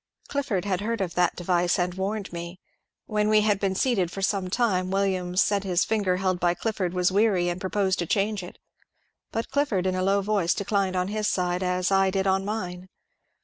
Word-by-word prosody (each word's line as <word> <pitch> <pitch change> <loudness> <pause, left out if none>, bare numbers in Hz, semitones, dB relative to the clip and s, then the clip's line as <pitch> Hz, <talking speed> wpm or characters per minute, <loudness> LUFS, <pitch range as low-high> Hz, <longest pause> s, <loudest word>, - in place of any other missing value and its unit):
Clifford 270 -10 -1
had 190 -2 -1
heard 230 +2 -2
of 180 -3 -2
that 180 0 +2
device 175 0 +1
and 180 0 0
warned 195 +1 -3
me. 170 +1 -6 0.5
When 210 0 0
we 215 0 +5
had 210 -2 +2
been 195 -2 0
seated 200 -6 +1
for 195 +2 -6
some 190 -2 0
time 185 -4 +1
Williams 190 -2 +1
said 200 -1 0
his 180 -2 +1
finger 200 -5 +1
held 185 -1 0
by 175 0 +2
Clifford 185 -4 -2
was 180 0 +2
weary, 195 -3 +2
and 175 +1 -4
proposed 190 0 0
to 175 - -2
change 205 +2 0
it, 180 - -10 0.7
but 225 +3 -3
Clifford 265 -10 +1
in 185 - +1
a 185 - -1
low 195 +1 +2
voice 195 -4 +1
declined 200 -2 0
on 180 +1 0
his 215 0 -1
side, 180 -2 0
as 180 0 0
I 195 0 +4
did 190 0 -1
on 190 0 +2
mine. 185 -3 -5
190 Hz, 205 wpm, -26 LUFS, 180-205 Hz, 0.7 s, we